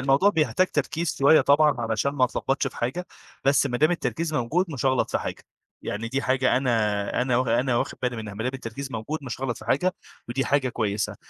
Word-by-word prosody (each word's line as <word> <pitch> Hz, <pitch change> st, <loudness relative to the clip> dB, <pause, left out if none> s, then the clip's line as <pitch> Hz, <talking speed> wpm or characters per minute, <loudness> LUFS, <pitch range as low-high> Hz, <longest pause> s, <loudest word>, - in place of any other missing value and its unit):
الموضوع 135 Hz, +9 st, +4 dB
بيحتاج 185 Hz, +1 st, +2 dB
تركيز 165 Hz, +1 st, -2 dB
شوية 140 Hz, +3 st, +6 dB
طبعًا 150 Hz, +1 st, +4 dB
علشان 115 Hz, +4 st, 0 dB
ما 140 Hz, -3 st, +3 dB
أتلخبطش 135 Hz, +2 st, -1 dB
في -, -, -6 dB
حاجة، 140 Hz, +10 st, -3 dB, 0.4 s
بس 140 Hz, +1 st, +4 dB
ما 125 Hz, -3 st, -2 dB
دام 155 Hz, +4 st, +4 dB
التركيز 165 Hz, -2 st, -2 dB
موجود 150 Hz, +8 st, +1 dB
مش 135 Hz, -2 st, -2 dB
هاغلط 130 Hz, -1 st, +1 dB
في -, -, +1 dB
حاجة، -, -, -6 dB, 0.4 s
يعني 110 Hz, +3 st, -4 dB
دي 135 Hz, +3 st, -1 dB
حاجة 130 Hz, 0 st, +2 dB
أنا 110 Hz, -5 st, 0 dB
أنا 125 Hz, -1 st, +1 dB
واخ 125 Hz, 0 st, +1 dB
أنا 120 Hz, +2 st, +2 dB
واخد -, -, -2 dB
بالي 125 Hz, -1 st, -1 dB
منها، 110 Hz, -2 st, -6 dB
ما 110 Hz, -, -4 dB
دام 130 Hz, -, -1 dB
التركيز 135 Hz, +2 st, -6 dB
موجود 115 Hz, +8 st, -3 dB
مش 130 Hz, -2 st, -6 dB
هاغلط 130 Hz, -3 st, -2 dB
في -, -, -12 dB
حاجة 180 Hz, +7 st, +1 dB, 0.3 s
ودي 135 Hz, +3 st, -1 dB
حاجة 140 Hz, -2 st, +1 dB
كويسة، 105 Hz, -4 st, -2 dB
130 Hz, 210 wpm, -25 LUFS, 120-145 Hz, 0.4 s, شوية